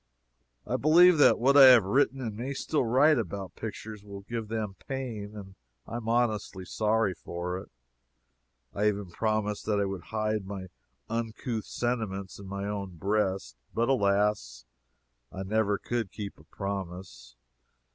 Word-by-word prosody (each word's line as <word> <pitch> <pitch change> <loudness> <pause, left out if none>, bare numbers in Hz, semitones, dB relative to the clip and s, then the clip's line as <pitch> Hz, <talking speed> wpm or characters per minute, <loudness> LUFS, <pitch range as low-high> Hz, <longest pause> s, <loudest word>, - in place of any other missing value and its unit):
I 125 - -1
believe 165 +4 +6
that - - +7
what 135 +4 +3
I 140 -2 +11
have 125 -4 +9
written 135 +6 +2
and 110 -4 -4
may 130 +5 -4
still 150 +2 0
write 130 +5 +4
about 95 -3 -5
pictures 110 -1 -7
will 100 -1 -9
give 115 +2 -5
them 110 -2 -3
pain, 115 -6 -5
and 95 -2 -9 0.3
I 115 - -5
am 115 -1 -5
honestly 110 -5 0
sorry 110 0 +1
for 90 +1 -5
it. - - -12 1.0
I 105 +1 +1
even 100 -3 -1
promised 110 +1 -1
that 105 -2 +2
I 100 - +2
would 95 -3 -5
hide 110 -2 -2
my 95 -2 -6 0.4
uncouth 115 0 -3
sentiments 110 -6 -3
in 100 - -9
my 100 +1 -4
own 100 -4 -5
breast. 95 - -1 0.2
But 115 +2 +1
alas! 100 - +1 0.7
I 95 - -5
never 105 0 +1
could 115 -4 -3
keep 100 -6 -7
a 75 - -18
promise. 90 -10 -6
105 Hz, 155 wpm, -29 LUFS, 95-115 Hz, 1.0 s, I